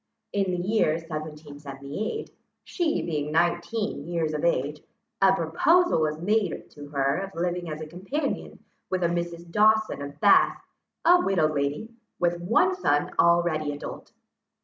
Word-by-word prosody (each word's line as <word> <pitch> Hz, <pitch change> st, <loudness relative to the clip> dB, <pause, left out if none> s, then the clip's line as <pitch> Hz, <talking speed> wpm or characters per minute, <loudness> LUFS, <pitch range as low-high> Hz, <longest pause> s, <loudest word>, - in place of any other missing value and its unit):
In 195 Hz, -2 st, +1 dB
the 180 Hz, 0 st, -2 dB
year 210 Hz, -7 st, +3 dB
1778, 155 Hz, -, -6 dB, 0.3 s
she 340 Hz, -4 st, -1 dB
being 150 Hz, -3 st, -2 dB
nineteen 175 Hz, +2 st, 0 dB
years 165 Hz, -3 st, -1 dB
of 150 Hz, -, -3 dB
age, 150 Hz, -2 st, 0 dB, 0.4 s
a 195 Hz, -1 st, +6 dB
proposal 195 Hz, -, +3 dB
was 155 Hz, 0 st, 0 dB
made 205 Hz, +5 st, -1 dB
to 145 Hz, -1 st, -10 dB
her 140 Hz, -1 st, +1 dB
of 195 Hz, 0 st, -6 dB
living 175 Hz, 0 st, -2 dB
as 155 Hz, 0 st, -5 dB
a -, -, -4 dB
companion 190 Hz, -, -4 dB, 0.3 s
with 185 Hz, -1 st, -1 dB
a -, -, +4 dB
Mrs. 170 Hz, 0 st, -4 dB
Dawson 215 Hz, -3 st, +3 dB
of 140 Hz, 0 st, -8 dB
Bath, 205 Hz, -2 st, +5 dB, 0.5 s
a 355 Hz, +1 st, +7 dB
widow 185 Hz, -5 st, +2 dB
lady, 145 Hz, +10 st, -2 dB, 0.3 s
with 175 Hz, 0 st, 0 dB
one 230 Hz, -, +3 dB
son 145 Hz, -, +1 dB
already 170 Hz, -3 st, +3 dB
adult. 145 Hz, -, -8 dB
170 Hz, 145 wpm, -26 LUFS, 150-195 Hz, 0.5 s, a